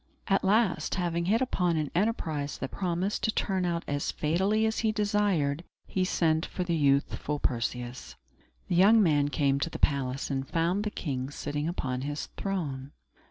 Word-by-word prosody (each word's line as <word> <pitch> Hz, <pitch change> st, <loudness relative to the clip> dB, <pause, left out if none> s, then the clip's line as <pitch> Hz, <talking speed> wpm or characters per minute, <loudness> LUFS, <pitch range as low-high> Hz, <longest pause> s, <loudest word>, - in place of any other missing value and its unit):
At 195 Hz, -, +2 dB
last, 200 Hz, -1 st, +2 dB
having 170 Hz, -2 st, -1 dB
hit 220 Hz, +6 st, +2 dB
upon 180 Hz, -9 st, +1 dB
an 150 Hz, -2 st, -1 dB
enterprise 165 Hz, -8 st, -1 dB
that 135 Hz, -, -5 dB
promised 185 Hz, +2 st, -1 dB
to 220 Hz, -, +1 dB
turn 190 Hz, -3 st, 0 dB
out 170 Hz, -1 st, -1 dB
as 145 Hz, 0 st, -1 dB
fatally 190 Hz, +8 st, +1 dB
as 220 Hz, 0 st, 0 dB
he 220 Hz, -1 st, +2 dB
desired, 205 Hz, -8 st, +1 dB, 0.2 s
he 190 Hz, -, -1 dB
sent 160 Hz, -3 st, +2 dB
for 185 Hz, -, -3 dB
the 175 Hz, -1 st, -1 dB
youthful 145 Hz, 0 st, +1 dB
Perseus. 120 Hz, -, -3 dB, 0.5 s
The -, -, -1 dB
young 210 Hz, +5 st, +6 dB
man 145 Hz, -4 st, +3 dB
came 140 Hz, -2 st, +1 dB
to 165 Hz, -, -1 dB
the -, -, -6 dB
palace, 135 Hz, -1 st, 0 dB
and 135 Hz, 0 st, -2 dB
found 175 Hz, +5 st, +1 dB
the -, -, 0 dB
king 135 Hz, -9 st, -3 dB
sitting 145 Hz, +1 st, -3 dB
upon 130 Hz, -7 st, -2 dB
his 145 Hz, +2 st, -4 dB
throne. 145 Hz, -9 st, -3 dB
165 Hz, 170 wpm, -29 LUFS, 140-195 Hz, 0.5 s, young